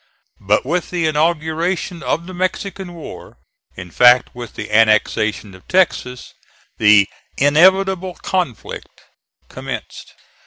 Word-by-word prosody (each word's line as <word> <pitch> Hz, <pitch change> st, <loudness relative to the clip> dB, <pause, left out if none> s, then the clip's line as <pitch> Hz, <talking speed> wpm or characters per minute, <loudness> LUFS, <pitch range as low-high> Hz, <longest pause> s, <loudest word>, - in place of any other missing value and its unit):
But 105 Hz, +5 st, +1 dB
with 175 Hz, +5 st, -2 dB
the 175 Hz, -2 st, -1 dB
inauguration 160 Hz, +3 st, -1 dB
of 165 Hz, +3 st, -2 dB
the 185 Hz, -, -9 dB
Mexican 185 Hz, 0 st, -4 dB
war, 165 Hz, -, -11 dB, 0.4 s
in 90 Hz, -2 st, -9 dB
fact 125 Hz, +3 st, +5 dB
with 120 Hz, -3 st, -9 dB
the -, -, -7 dB
annexation 110 Hz, -1 st, +2 dB
of 95 Hz, -, -17 dB
Texas, 160 Hz, -9 st, 0 dB, 0.5 s
"the 105 Hz, -2 st, +5 dB, 0.3 s
inevitable 185 Hz, +5 st, +3 dB
conflict" 180 Hz, -, -5 dB, 0.5 s
commenced. -, -, -8 dB
155 Hz, 110 wpm, -18 LUFS, 115-180 Hz, 0.5 s, fact